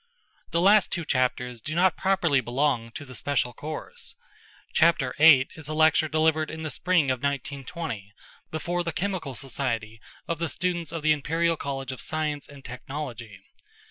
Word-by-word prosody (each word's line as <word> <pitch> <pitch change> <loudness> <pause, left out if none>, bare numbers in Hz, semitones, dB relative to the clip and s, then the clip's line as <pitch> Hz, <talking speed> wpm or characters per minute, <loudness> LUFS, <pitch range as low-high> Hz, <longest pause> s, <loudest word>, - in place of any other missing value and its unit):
The 170 - +1
last 200 +1 +5
two 170 -2 -2
chapters 125 -3 0
do 155 +7 -5
not 180 0 +4
properly 175 -8 +2
belong 125 -1 0
to 145 - -7
the 130 - -11
special 125 0 0
course. 155 - -5 0.6
Chapter 160 -6 +3
VIII 150 -4 +7
is 160 -3 -10
a 155 - -3
lecture 155 0 +4
delivered 155 0 +2
in 160 0 -6
the 155 - -3
spring 170 -6 +2
of 130 - -1
1920 140 - -4 0.4
before 175 +3 -2
the 170 -1 -2
Chemical 185 -8 -2
Society 115 -4 -3 0.3
of 165 -2 -2
the 170 -1 -1
students 175 +1 -2
of 165 -2 -5
the 155 - +4
Imperial 165 +3 +1
College 135 -3 -4
of 130 - -4
Science 155 -2 -2
and 140 -2 -13
Technology. 125 -5 -7
150 Hz, 165 wpm, -26 LUFS, 130-165 Hz, 0.6 s, VIII